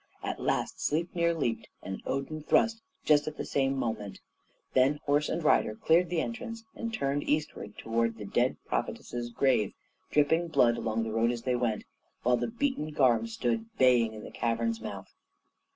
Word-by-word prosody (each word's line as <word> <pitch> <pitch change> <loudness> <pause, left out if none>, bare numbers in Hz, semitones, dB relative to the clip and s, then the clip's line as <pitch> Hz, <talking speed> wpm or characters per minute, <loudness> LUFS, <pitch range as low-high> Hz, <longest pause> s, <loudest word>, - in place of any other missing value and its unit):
At - - -3
last - - -1
Sleipnir 170 +2 +1
leaped, 115 -7 -1 0.2
and 95 0 -5
Odin 140 +3 -2
thrust 225 +8 +2 0.2
just 150 -1 +4
at 155 - -4
the - - -3
same 135 0 +1
moment; 110 -5 -3 0.5
then 135 +3 +4
horse 145 +1 +2
and 165 - -2
rider 110 -8 +3
cleared 170 +7 +3
the 170 -2 +1
entrance, 230 +1 -5
and 230 0 -4
turned 140 -8 0
eastward 150 -8 -2
towards 115 0 0
the 105 - -7
dead - - +1
prophetess's 120 0 -3
grave, 120 -4 +2 0.4
dripping 160 +4 +3
blood 120 -7 +4
along 115 -1 -1
the 110 -1 -3
road 115 +1 +3
as 120 -1 -3
they 125 -1 +1
went; 120 -3 0 0.4
while 125 +1 +4
the - - -1
beaten 240 - -1
Garm 135 - +3
stood 225 0 -1
baying 120 -4 +4
in 105 - -8
the - - -9
cavern's 115 -1 -1
mouth. - - -7
135 Hz, 170 wpm, -30 LUFS, 115-160 Hz, 0.5 s, just